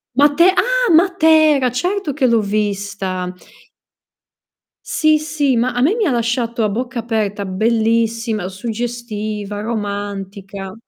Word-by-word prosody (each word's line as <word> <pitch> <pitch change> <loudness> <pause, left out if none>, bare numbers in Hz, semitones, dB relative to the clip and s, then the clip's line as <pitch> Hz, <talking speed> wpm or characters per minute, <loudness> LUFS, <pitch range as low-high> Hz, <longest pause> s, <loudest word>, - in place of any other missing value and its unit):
Mate 290 +6 +5
Ah! - - +2
Matera. 315 -6 +4
Certo 355 +4 -2
che 270 -1 0
l'ho 235 -3 +3
vista. 200 -3 -2 1.5
Sì, 310 -1 +2
sì, 295 -4 0
ma 245 +1 +1
a 245 - -1
me 320 +10 +3
mi 450 - 0
ha 310 - +1
lasciato 235 -1 -1
a 215 - +1
bocca 245 +4 -3
aperta. 215 -3 -2
Bellissima, 225 +1 0
suggestiva, 215 -1 -5
romantica. 200 -3 -5
230 Hz, 115 wpm, -18 LUFS, 205-280 Hz, 1.5 s, Mate